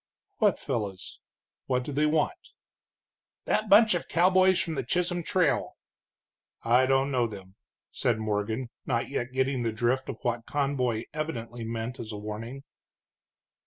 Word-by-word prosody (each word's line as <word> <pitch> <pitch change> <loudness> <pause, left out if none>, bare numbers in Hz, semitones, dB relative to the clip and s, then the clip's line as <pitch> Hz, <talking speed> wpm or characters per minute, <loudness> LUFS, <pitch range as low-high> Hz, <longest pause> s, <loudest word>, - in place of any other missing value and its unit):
"What 210 -4 +4
fellows? 105 -8 -4 0.5
What 125 -1 +1
do 145 - -5
they 150 +2 +2
want?" 160 - -1 0.9
"That 215 - 0
bunch 215 +1 +7
of 175 - -2
cowboys 185 +2 +4
from 165 - -1
the 135 - -1
Chisholm 175 +7 -1
Trail." - - +1 0.9
"I 125 +3 +4
don't 135 +1 +2
know 125 -3 +2
them," 95 -3 -10 0.4
said 120 -3 +1
Morgan, 110 +3 -2 0.2
not 120 -3 0
yet 120 +1 -3
getting 130 0 0
the 115 -1 0
drift 120 +4 0
of 125 - -4
what 120 -1 -2
Conboy 130 -6 0
evidently 120 -7 -4
meant 115 +2 -4
as 110 -1 -6
a 105 - -5
warning. 110 +6 -6
125 Hz, 145 wpm, -28 LUFS, 115-150 Hz, 0.9 s, bunch